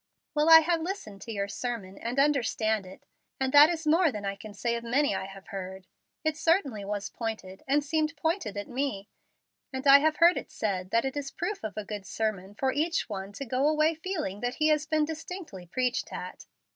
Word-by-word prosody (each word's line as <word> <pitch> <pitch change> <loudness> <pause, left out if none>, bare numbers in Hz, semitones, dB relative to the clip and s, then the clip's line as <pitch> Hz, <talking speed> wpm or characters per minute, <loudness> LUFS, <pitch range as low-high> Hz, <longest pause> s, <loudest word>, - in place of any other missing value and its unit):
"Well, 300 +1 +3
I 325 0 +11
have 335 0 +1
listened 320 - -5
to 230 - -7
your 200 -2 -2
sermon 210 -3 -4
and 240 +3 -4
understand 225 -7 +1
it, 185 - -13 0.3
and 265 -1 0
that 290 +2 +9
is 330 -2 -3
more 320 +1 +4
than 210 -4 -6
I 195 0 -2
can 210 +2 -10
say 235 +4 -1
of 235 - -4
many 265 +2 +2
I 190 - -3
have 195 +2 -12
heard. 190 -2 -6 0.4
It 315 -1 +1
certainly 315 - +1
was 200 0 -4
pointed, 220 -5 -5
and 285 +2 +3
seemed 310 +2 -1
pointed 320 - -1
at 205 - -4
me, 250 -6 -3 0.6
and 260 0 -5
I 280 0 +9
have 310 +1 +2
heard 340 +2 +5
it - - -5
said 200 -11 -2
that 230 +5 +2
it 265 - -2
is 285 -1 -3
proof 360 - -4
of 215 -1 -5
a 215 - -3
good 205 -3 -6
sermon 205 -2 -3
for 260 +3 0
each 320 -1 0
one 195 -1 -5
to 275 - -6
go 260 +4 +1
away 310 +1 +3
feeling 320 - -4
that 245 +2 -2
he 310 0 +2
has 300 -1 +2
been 310 -1 +2
distinctly 320 - -7
preached 250 +6 -1
at. - - -7
255 Hz, 215 wpm, -28 LUFS, 205-310 Hz, 0.6 s, I